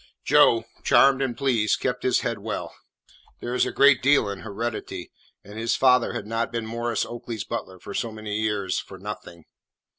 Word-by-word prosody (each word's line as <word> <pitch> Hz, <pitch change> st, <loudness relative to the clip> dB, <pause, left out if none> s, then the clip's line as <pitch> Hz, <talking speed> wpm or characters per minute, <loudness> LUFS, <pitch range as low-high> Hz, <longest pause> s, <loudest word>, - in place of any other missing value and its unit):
Joe, 115 Hz, -1 st, +5 dB, 0.2 s
charmed 135 Hz, 0 st, +5 dB
and 130 Hz, -3 st, -2 dB
pleased, 120 Hz, -7 st, +1 dB
kept -, -, -2 dB
his -, -, +2 dB
head -, -, -2 dB
well. -, -, -5 dB, 0.7 s
There 120 Hz, -, -4 dB
is 125 Hz, -, +2 dB
a -, -, -3 dB
great 140 Hz, -2 st, +5 dB
deal 135 Hz, -5 st, +4 dB
in 100 Hz, -1 st, -5 dB
heredity, 110 Hz, +3 st, -5 dB, 0.3 s
and 105 Hz, +2 st, -9 dB
his 115 Hz, +1 st, 0 dB
father 125 Hz, -2 st, +4 dB
had -, -, -4 dB
not 115 Hz, +2 st, -2 dB
been 115 Hz, -2 st, -3 dB
Maurice 115 Hz, +1 st, -2 dB
Oakley's 120 Hz, -3 st, -6 dB
butler 95 Hz, -, -5 dB
for 100 Hz, -, -9 dB
so 115 Hz, -, -2 dB
many 110 Hz, -1 st, -4 dB
years 105 Hz, -3 st, -1 dB
for 95 Hz, -, -10 dB
nothing. 95 Hz, -4 st, -8 dB
115 Hz, 180 wpm, -25 LUFS, 105-120 Hz, 0.7 s, Joe